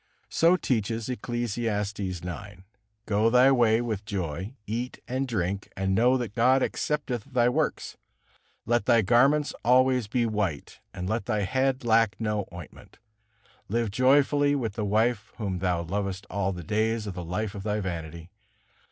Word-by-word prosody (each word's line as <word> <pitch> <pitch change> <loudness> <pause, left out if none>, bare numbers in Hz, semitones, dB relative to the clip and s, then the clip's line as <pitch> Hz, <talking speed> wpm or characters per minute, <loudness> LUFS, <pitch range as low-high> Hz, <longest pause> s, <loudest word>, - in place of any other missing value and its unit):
So 170 +2 +4
teaches 115 - -1
Ecclesiastes 115 -4 -2
ix: 95 -4 -3 0.8
"Go 105 +2 +2
thy 125 +3 +6
way 120 -3 +4
with 110 -4 -3
joy, 95 - -4
eat 120 +4 -4
and 130 +2 -2
drink, 100 -4 -2
and 95 0 0
know 125 +6 +4
that 120 -5 -4
God 130 +3 +3
accepteth 140 -7 -2
thy 125 -3 +2
works. 125 - -1 0.7
Let 120 -3 +1
thy 115 -2 +5
garments 135 +8 +3
be - - -12
always 125 -2 +3
white; 105 - -1
and 90 - -5
let 110 +3 -2
thy 105 -3 0
head 130 +5 0
lack 115 -2 +3
no 105 -2 -1
ointment. 85 -2 -12 0.7
Live 115 0 0
joyfully 145 +4 +3
with 115 -7 -2
the 105 0 -3
wife 110 +1 0
whom 95 -5 -3
thou 90 -2 0
lovest 95 +2 -3
all 100 -1 0
the 90 -2 -6
days 110 +4 0
of 100 - -5
the 90 0 -6
life 100 +5 -3
of 100 - -6
thy 105 +1 -1
vanity." 85 -2 -6
110 Hz, 155 wpm, -27 LUFS, 100-125 Hz, 0.8 s, thy